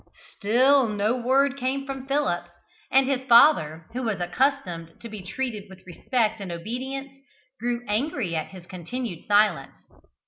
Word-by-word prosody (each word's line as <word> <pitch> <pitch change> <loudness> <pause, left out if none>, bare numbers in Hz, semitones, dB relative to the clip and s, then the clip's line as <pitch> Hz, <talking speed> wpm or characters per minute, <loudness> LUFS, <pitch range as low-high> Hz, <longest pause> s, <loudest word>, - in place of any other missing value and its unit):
Still 255 +4 +4
no 210 +2 0
word 270 +3 +2
came 270 +1 -2
from 270 -1 -6
Philip, 275 -12 0 0.4
and 270 0 +4
his 265 -1 0
father, 170 - +5
who 255 - -3
was 220 -6 -2
accustomed 175 - -1
to 235 - -8
be 215 -2 -7
treated 210 +1 -4
with 190 0 -15
respect 215 +5 -1
and 190 -3 -5
obedience, 260 +9 -5 0.5
grew 240 +1 -2
angry 220 - -1
at 160 - -2
his 185 -2 -12
continued 185 +2 -6
silence. 205 -9 +2
235 Hz, 145 wpm, -25 LUFS, 185-265 Hz, 0.5 s, father